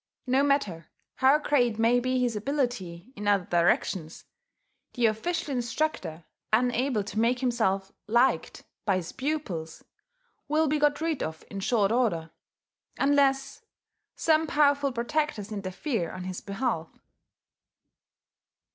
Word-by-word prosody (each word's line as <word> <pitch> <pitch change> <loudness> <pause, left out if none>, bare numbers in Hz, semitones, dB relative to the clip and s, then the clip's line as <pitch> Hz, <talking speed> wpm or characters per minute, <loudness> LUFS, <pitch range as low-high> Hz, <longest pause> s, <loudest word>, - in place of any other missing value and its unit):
No 260 +1 +3
matter 210 - 0 0.3
how 265 +2 +5
great 250 -7 +1
may 230 +2 +4
be 255 +1 0
his 245 -3 0
ability 240 -5 -3
in 205 0 -5
other 200 -3 +3
directions, 170 -1 0 0.7
the 245 -2 +2
official 280 +8 -1
instructor, 240 - -2 0.3
unable 245 0 +2
to 215 +2 -4
make 235 +2 +3
himself 220 -7 0 0.2
liked 240 +4 +1 0.2
by 195 - +2
his 180 -3 -3
pupils, 260 - -4 0.6
will 310 +2 +2
be 300 +1 +1
got 295 0 +2
rid 320 -4 -1
of 160 0 -5
in 195 - -5
short 205 0 +2
order 200 -10 0 0.7
unless 275 +4 +2 0.5
some 320 0 +2
powerful 285 -2 +3
protectors 240 -3 -2
interfere 200 - -3
on 185 - -7
his 185 0 -5
behalf. 200 -5 -2
240 Hz, 120 wpm, -27 LUFS, 195-280 Hz, 0.7 s, how